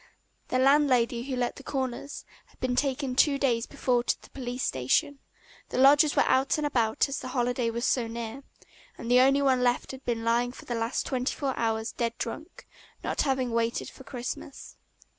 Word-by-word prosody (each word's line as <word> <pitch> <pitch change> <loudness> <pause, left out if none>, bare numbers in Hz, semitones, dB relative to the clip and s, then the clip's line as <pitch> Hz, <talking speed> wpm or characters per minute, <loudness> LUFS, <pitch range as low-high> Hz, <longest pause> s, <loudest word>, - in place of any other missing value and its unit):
The 255 - 0
landlady 260 -3 +3
who 260 - -1
let 245 -1 -2
the 275 - -11
"corners" 265 0 -4 0.2
had - - -27
been 255 -1 -1
taken 270 0 0
two 280 +1 +4
days 245 -4 +1
before 250 -4 0
to - - 0
the - - -18
police 250 -1 -5
station, 130 - 0 0.5
the - - -4
lodgers 285 +3 +6
were - - +5
out 265 +3 +2
and 300 - -1
about 235 -5 +1
as 275 - -4
the - - -7
holiday 245 -1 0
was 235 +2 -2
so 240 -3 +1
near, 230 +2 -6 0.6
and 235 - -5
the 250 - +7
only 275 +2 +4
one 260 -2 +3
left 245 0 +1
had 265 0 -10
been 230 -2 -2
lying 240 +2 +1
for - - -12
the 240 - -4
last 230 +2 -1
twenty 255 0 -1
four 275 -3 -2
hours 225 0 -1
dead 235 -1 -2
drunk, - - -7 0.4
not - - -1
having 265 -3 0
waited 230 0 -1
for 265 - -14
Christmas. 255 +1 -7
250 Hz, 195 wpm, -28 LUFS, 235-270 Hz, 0.6 s, the